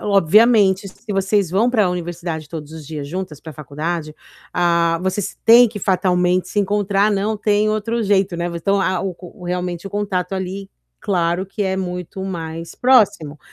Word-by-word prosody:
obviamente, 200 +1 +4
se 210 +3 -8
vocês 195 -1 +1
vão 215 +7 +2
para 215 -6 +2
universidade 170 -3 -4
todos 155 -1 -8
os 160 -1 -9
dias 145 -1 -6
juntas, 170 -2 -6
para 160 - -9
faculdade, 155 +2 -4 0.4
ah, 170 -1 +2
vocês 190 +1 -2
têm 235 +1 +8
que 210 -1 -7
fatalmente 180 -1 +1
se - - -2
encontrar, 205 +1 +1
não 205 +2 0
tem 210 0 +1
outro 220 +2 -1
jeito, 195 -3 +1
né, 170 +1 -2
v 170 - -5
então 195 +4 +1
a 185 -2 0
o 190 -1 -3
o 180 0 -12
realmente 180 0 -3
o - - -7
contato 200 -2 -2
ali, 190 +1 -5 0.3
claro 175 0 0
que 205 +2 -4
é 190 -1 -1
muito 180 +1 -5
mais 165 -3 -6
próximo. 205 - +3
190 Hz, 175 wpm, -19 LUFS, 170-205 Hz, 0.4 s, têm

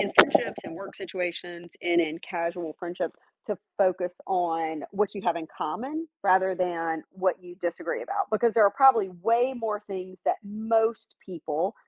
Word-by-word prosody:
in - - 0
friendships - - +6
and - - -7
work 195 +3 -9
situations 175 -2 -5
and 175 0 +4
in 160 -1 -1
casual 170 -3 -3
friendships 175 -1 -4 0.3
to 210 - -2 0.2
focus 180 -2 +2
on 165 -4 0
what 205 +1 0
you 200 - -6
have 175 -3 +2
in 160 -1 -5
common 275 - -3 0.2
rather 190 0 +4
than 165 -3 -1
what 190 -1 0
you 175 0 -12
disagree 325 - -2
about, 395 -4 -1
because 225 +1 +3
there 220 -1 +6
are - - +4
probably 255 -7 +6
way 235 +4 +3
more 215 -2 -2
things 185 -1 -7
that - - +2
most 225 +2 0
people 170 +2 -2
185 Hz, 165 wpm, -27 LUFS, 170-215 Hz, 0.3 s, friendships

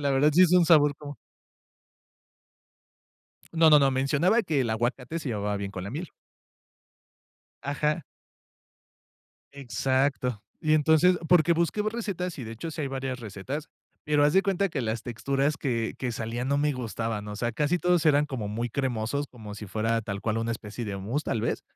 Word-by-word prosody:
la 140 -1 0
verdad, 145 +3 +4
sí 180 +4 +6
es 180 -1 +4
un 180 -2 +6
sabor 150 -3 +5
como 145 -1 -9 2.4
No, 160 -1 +5
no, 150 - +8
no, 135 -1 +4
mencionaba 150 - +2
que 155 -6 0
el 115 -3 0
aguacate 125 +7 -2
se 145 - -5
llevaba 105 -2 -2
bien 100 -1 -4
con 95 -2 -6
la 100 - -5
miel. 160 +6 -5 1.5
Ajá. 150 +3 -1 1.5
Exacto, 130 -3 -1 0.2
y 155 -2 +1
entonces, 160 +4 +4
porque 175 -1 +5
busqué 170 +5 0
recetas 200 -7 -3
y, 125 - -5
de 115 - -7
hecho, 125 +9 -6
sí 155 - -6
hay 140 - -2
varias 130 -1 -4
recetas, 115 +9 -6 0.4
pero 150 -1 +3
haz 150 - +4
de 190 - +4
cuenta 195 0 +1
que 155 -5 -3
las 110 0 -2
texturas 135 +5 -1
que 115 -5 -2
que 125 -2 -2
salía 115 +1 -3
no 140 +2 +1
me 150 +1 +2
gustaban, 115 -4 -4
o 105 - -6
sea, 120 +2 -1
casi 150 +7 +1
todos 175 -2 +2
eran 150 0 +4
como 120 -7 -4
muy 115 +3 -2
cremosos, 130 +2 -2
como 110 -4 -10
si 105 0 -8
fuera 110 +3 0
tal 100 -1 -5
cual 110 0 -1
una 115 +1 -2
especie 115 +1 -6
de 100 -2 -4
mousse 115 +10 -2
tal 110 - -1
vez, 115 - -2
135 Hz, 180 wpm, -27 LUFS, 115-155 Hz, 2.4 s, no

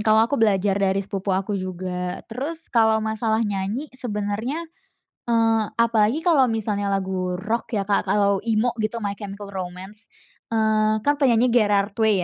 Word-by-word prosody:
kalau 220 +1 +4
aku 265 +5 -1
belajar 200 -2 +2
dari 195 0 +1
sepupu 195 0 -4
aku 195 +2 -2
juga. 180 -1 -4
Terus 300 +8 -5
kalau 220 -2 +4
masalah 220 +1 0
nyanyi 205 +8 -3
sebenernya, 230 +5 -3 0.7
eee, 225 -2 +3
apalagi 230 +5 +2
kalau 310 -7 +5
misalnya 210 -3 -1
lagu 190 -2 -1
rock 220 +6 -3
ya 200 - 0
Kak, 200 0 0
kalau 200 0 +3
emo 225 +2 +1
gitu, 215 +2 -1
My 200 - -1
Chemical 200 0 -7
Romance, 190 +3 -7 0.4
eee 215 -1 +2
kan 290 0 +3
penyanyinya 245 -3 +3
Gerard 205 -3 +2
Way 220 -1 +4
215 Hz, 150 wpm, -23 LUFS, 195-230 Hz, 0.7 s, kalau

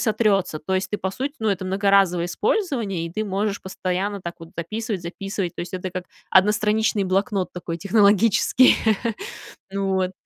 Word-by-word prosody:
сотрется. 210 -7 +1
То 190 +5 -3
есть, 185 0 -1
ты, 210 - -2
по 190 - -2
сути, 275 +5 -3
ну, 220 -1 0
это 190 -1 -2
многоразовое 195 -2 +3
использование, 230 - -1
и 165 - -9
ты 215 +2 -2
можешь 200 +1 -1
постоянно 190 +2 -2
так 170 -1 -6
вот 165 - -11
дописывать, 210 +2 -3
записывать. 195 +1 -4
То - - -6
есть 175 +1 -6
это 185 0 -4
как 180 -1 -5 0.2
одностраничный 210 +1 +3
блокнот 190 0 0
такой 170 -1 -5
технологический. 205 +6 +4 1.0
Вот. 190 -1 0
195 Hz, 160 wpm, -23 LUFS, 185-210 Hz, 1.0 s, технологический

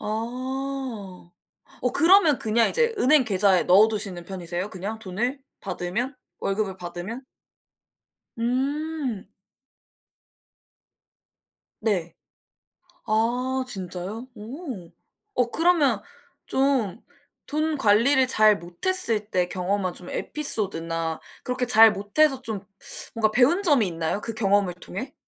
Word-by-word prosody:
아. 245 -4 -5 0.5
어 250 - 0
그러면 330 -4 +5
그냥 225 +1 +2
이제 470 -1 +1
은행 285 -2 +5
계좌에 195 -3 +3
넣어두시는 200 -2 +2
편이세요? 180 +1 -5
그냥 200 +4 -6
돈을 220 +7 -3 0.2
받으면 195 +8 -3 0.3
월급을 195 -1 -2
받으면? 180 +7 -7 1.2
음. 265 0 -2 2.6
네. 180 -7 -1 0.9
아 245 +4 0
진짜요? 190 +3 -5
오. 230 - -8 0.4
어 245 -1 0
그러면 330 -3 +2 0.4
좀 260 -7 0 0.5
돈 310 +1 -1
관리를 260 +3 +4
잘 215 -4 +5
못했을 215 - +2
때 180 -1 0
경험한 185 0 -1
좀 180 0 -6
에피소드나 165 - -1 0.2
그렇게 250 0 -2
잘 225 -2 +7
못해서 260 +8 +1
좀 220 -5 -5 0.5
뭔가 225 -1 +2
좀 - - -9
배운 265 - +4
점이 290 - +3
있나요? 165 +3 -3
그 230 - -4
경험을 200 -4 +1
통해? 195 +9 -8
220 Hz, 215 characters per minute, -24 LUFS, 190-265 Hz, 2.6 s, 잘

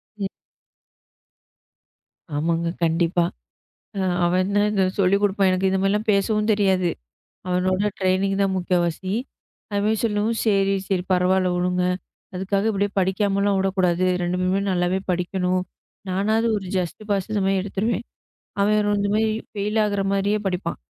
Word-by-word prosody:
ம். 200 -2 -2 2.1
ஆமாங்க 165 +2 0
கண்டிப்பா. 170 +1 +2 0.7
அ - - -1 0.3
அவன் 185 +3 +1
தான் 205 0 +3
இதைச் 190 -2 0
சொல்லிக் 195 +2 +3
கொடுப்பான் 195 -1 +3
எனக்கு 185 +1 +1
இது 190 - +1
மாரிலாம் 210 +3 0
பேசவும் 210 +2 +1
தெரியாது 190 -4 +2 0.6
அவனோட 185 +3 +1
ட்ரைனிங் 190 +1 +1
தான் 195 -1 +1
முக்காவாசி. 180 +1 -1 0.6
அவன் 210 +2 +1
சொல்லவும் 220 +1 0
சரி, 195 -2 +2
சரி 185 -2 0
பரவால்ல 185 0 +2
விடுங்க. 180 0 0 0.5
அதுக்காக 195 +3 0
இப்டி 200 0 0
படிக்காமல்லாம் 200 +1 +1
விடக் 195 0 -1
கூடாது. 180 0 +2 0.2
2 175 +1 -1
பேருமே 185 +2 +1
நல்லாவே 180 +1 +1
படிக்கணும். 180 +1 0 0.5
நானாவது 215 +5 +1
ஒரு 190 -2 -6
ஜஸ்ட் 180 +3 -3
பாஸ் 200 0 0
அந்த 205 -2 0
மாரி 195 0 +2
எடுத்துருவேன். 205 +4 -2 0.6
அவன் 210 +1 +3
ஒரு - - +2
இந்த 200 0 0
மாரி 220 0 +2 0.3
பெய்ல் 210 +2 -1
ஆகுற 200 -1 0
மாரியே 200 +2 +1
படிப்பான். 180 -2 -2
195 Hz, 140 wpm, -23 LUFS, 180-205 Hz, 2.1 s, தான்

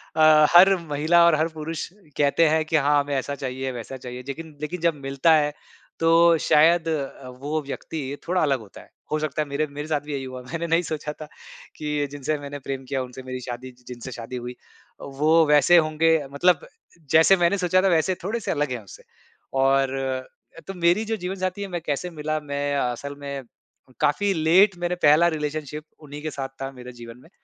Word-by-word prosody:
अ, 155 -1 +6
हर 190 +2 +8
महिला 155 +4 +3
और 170 -2 +5
हर 155 +1 +1
पुरुष 160 0 -5 0.3
कहते 145 +3 +3
हैं 160 0 +2
कि 160 - -2
हाँ, 145 0 +3
हमें 145 0 -2
ऐसा 140 +2 -2
चाहिए, 130 -1 -4
वैसा 125 +2 -7
चाहिए। 125 0 -8
जेकिन 150 +3 -8
लेकिन 165 +3 -4
जब 170 -2 +2
मिलता 140 +3 +2
है 150 -1 +1 0.5
तो 165 +1 +5
शायद 165 +2 +4
अ, 140 -4 -4
वो 145 +5 -4
व्यक्ति 140 0 -5
थोड़ा 180 +1 +1
अलग 140 -4 +1
होता 105 -3 -13
है। - - -19 0.2
हो 155 - +1
सकता 155 0 -2
है 150 - -3
मेरे 145 +2 -1
मेरे 145 +1 -7
साथ 150 -2 0
भी 150 +2 -9
यही 135 -1 -3
हुआ। 130 -1 -7
मैंने 165 +7 -5
नहीं 165 +1 +3
सोचा 150 -1 -4
था - - -5 0.5
कि 150 -1 -2
जिनसे 145 +2 -2
मैंने 145 0 -7
प्रेम 135 -1 -4
किया 135 -2 -1
उनसे 130 +1 -10
मेरी 130 0 -6
शादी 125 +1 -7
जि 125 - -25
जिनसे 125 +1 -8
शादी 120 +1 -7
हुई। 125 0 -6 0.6
वो 160 +2 +5
वैसे 150 +4 +6
होंगे 160 0 +3 0.2
मतलब 170 +2 +2 0.4
जैसे 160 +4 +6
मैंने 175 +3 +2
सोचा 185 0 +2
था 195 - +2
वैसे 175 +1 +2
थोड़े-से 220 +3 -2
अलग 145 -3 -1
है 120 -3 -4
उससे 100 - -14 0.6
और 135 0 +3 0.6
अ, - - -10
तो 195 - -5
मेरी 175 +4 +2
जो 225 +1 -1
जीवन 185 0 -4
साथी 185 +1 -3
है 200 - -3
मैं 175 -3 -4
कैसे 155 +3 -3
मिला, 155 -2 -3
मैं 145 -1 -3
असल 140 +2 -2
में 140 -1 -6 0.6
काफ़ी 195 +8 +2
लेट 180 +4 +4
मैंने 175 0 -1
पहला 155 +3 +6
रिलेशनशिप 150 -1 -4 0.2
उन्हीं 145 0 -9
के 155 0 -4
साथ 135 -2 -4
था 135 0 -4
मेरे 125 -1 -10
जीवन 120 0 -11
में 160 - -19
150 Hz, 205 wpm, -24 LUFS, 135-165 Hz, 0.6 s, हर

